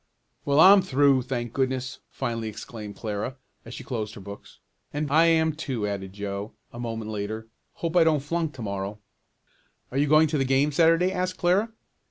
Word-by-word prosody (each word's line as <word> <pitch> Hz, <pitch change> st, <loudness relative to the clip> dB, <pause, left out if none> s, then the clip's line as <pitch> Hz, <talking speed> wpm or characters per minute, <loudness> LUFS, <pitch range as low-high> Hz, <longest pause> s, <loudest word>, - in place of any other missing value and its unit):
"Well, 140 Hz, +1 st, +3 dB
I'm 195 Hz, +4 st, +9 dB
through, 140 Hz, -5 st, +3 dB
thank 120 Hz, -2 st, -4 dB
goodness!" 130 Hz, 0 st, -2 dB
finally 115 Hz, -2 st, -3 dB
exclaimed 105 Hz, -1 st, -8 dB
Clara, 110 Hz, +4 st, -4 dB, 0.3 s
as -, -, -8 dB
she -, -, -8 dB
closed 110 Hz, -4 st, -4 dB
her -, -, -9 dB
books. 100 Hz, +1 st, -11 dB, 0.3 s
"And 145 Hz, -1 st, -3 dB
I 160 Hz, +3 st, +5 dB
am 160 Hz, -1 st, +3 dB
too," 130 Hz, -8 st, -3 dB
added 95 Hz, -2 st, -4 dB
Joe, 100 Hz, +1 st, -5 dB, 0.2 s
a 120 Hz, -, -8 dB
moment 115 Hz, -2 st, -4 dB
later. 110 Hz, +1 st, -4 dB, 0.3 s
"Hope 165 Hz, 0 st, -4 dB
I 175 Hz, -, +7 dB
don't 155 Hz, -3 st, +2 dB
flunk 160 Hz, +1 st, -2 dB
to 125 Hz, -, -7 dB
morrow." 100 Hz, 0 st, -4 dB, 0.9 s
"Are 135 Hz, -, -1 dB
you 145 Hz, -, +2 dB
going 155 Hz, +2 st, +5 dB
to 150 Hz, -1 st, 0 dB
the -, -, +2 dB
game 135 Hz, +3 st, +2 dB
Saturday?" 165 Hz, +4 st, +4 dB
asked 185 Hz, 0 st, -2 dB
Clara. 195 Hz, +6 st, +2 dB
130 Hz, 185 wpm, -26 LUFS, 110-160 Hz, 0.9 s, I'm